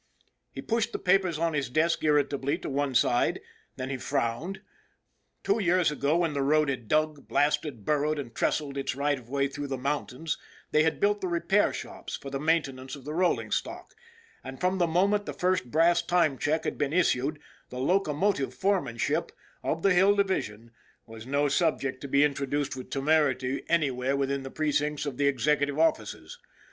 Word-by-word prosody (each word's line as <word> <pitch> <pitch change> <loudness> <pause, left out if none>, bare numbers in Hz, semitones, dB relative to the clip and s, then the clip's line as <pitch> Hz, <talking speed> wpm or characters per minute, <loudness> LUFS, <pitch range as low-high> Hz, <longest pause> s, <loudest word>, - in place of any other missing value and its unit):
He - - -7
pushed 230 0 -1
the - - -1
papers 185 -3 +2
on 165 0 0
his 140 -3 -1
desk 160 +6 +1
irritably 145 -2 +1
to - - -6
one 140 -1 -1
side. 120 +1 +2 0.4
Then 130 +1 -5
he 135 - -2
frowned. 145 +11 -2 0.8
Two 200 +3 +1
years 180 -4 +2
ago, 150 +2 +1
when 170 -3 0
the 140 - -1
road 150 +1 +3
had 125 -5 -4
dug, 155 +2 0
blasted, 145 -6 0
burrowed, 150 +1 +1
and 125 -5 -6
trestled 140 +1 -1
its 135 - -2
right 145 0 0
of 120 -1 -17
way 140 +1 +1
through 145 +1 -6
the 135 -1 -3
mountains, 145 +3 -3 0.3
they 150 - +4
had 160 +1 +1
built 205 0 +2
the 185 - -1
repair 175 +4 +2
shops - - -7
for 135 - -8
the 135 - -3
maintenance 135 -4 -1
of 135 -2 -13
the 150 - -4
rolling 180 +2 +1
stock, - - -3 0.5
and 130 0 -8
from 185 +1 0
the 175 - +3
moment 200 +5 +1
the - - -3
first 180 -8 0
brass 165 +5 +4
time 170 -5 +2
check 155 +2 0
had - - -3
been 145 0 0
issued 155 -4 +1 0.3
the 125 - -8
locomotive 150 - +1
foremanship 175 -8 0 0.3
of 165 - -2
the 195 - +5
Hill 195 +3 +5
Division 115 - -1 0.3
was 115 +1 -11
no 140 +2 +1
subject 140 -3 0
to 140 - -5
be 140 +1 +4
introduced 140 -1 -1
with 130 - -8
temerity 140 -3 +1
anywhere 135 -5 +1
within 140 0 -1
the 135 - -7
precincts 150 0 -1
of 140 -4 -4
the 145 - +2
executive 145 +1 +1
offices. 165 - -1
145 Hz, 180 wpm, -28 LUFS, 135-170 Hz, 0.8 s, the